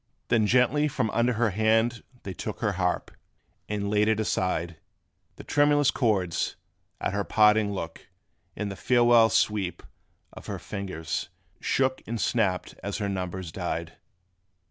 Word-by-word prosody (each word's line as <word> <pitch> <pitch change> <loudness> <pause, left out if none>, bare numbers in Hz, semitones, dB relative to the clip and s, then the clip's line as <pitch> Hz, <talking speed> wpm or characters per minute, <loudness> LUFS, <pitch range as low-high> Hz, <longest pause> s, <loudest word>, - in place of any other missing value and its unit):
Then 115 -3 +3
gently 130 +6 +3
from 125 -6 -1
under 120 +1 +2
her 110 -1 +1
hand 110 +3 +2 0.2
they 95 - -5
took 105 +3 -6
Her 105 -3 +1
harp, 90 -2 -1 0.6
and 105 -1 -2
laid 105 +1 +2
it 110 -1 +2
aside: 90 -6 -1 0.6
The - - -10
tremulous 145 -1 +3
chords, 100 -9 0 0.4
at - - -2
her 100 0 0
parting 105 0 +4
look 85 -4 -6 0.5
And 105 -1 -3
the - - -6
farewell 120 +1 +5
sweep 100 -6 0 0.5
of - - -11
her - - -3
fingers, 90 -4 -4 0.3
shook, 130 -1 0
And 115 +1 -3
snapped 100 -7 0
as 100 0 -3
her 100 -2 -2
numbers 95 -2 -4
died. 85 -1 -4
105 Hz, 145 wpm, -27 LUFS, 95-115 Hz, 0.6 s, farewell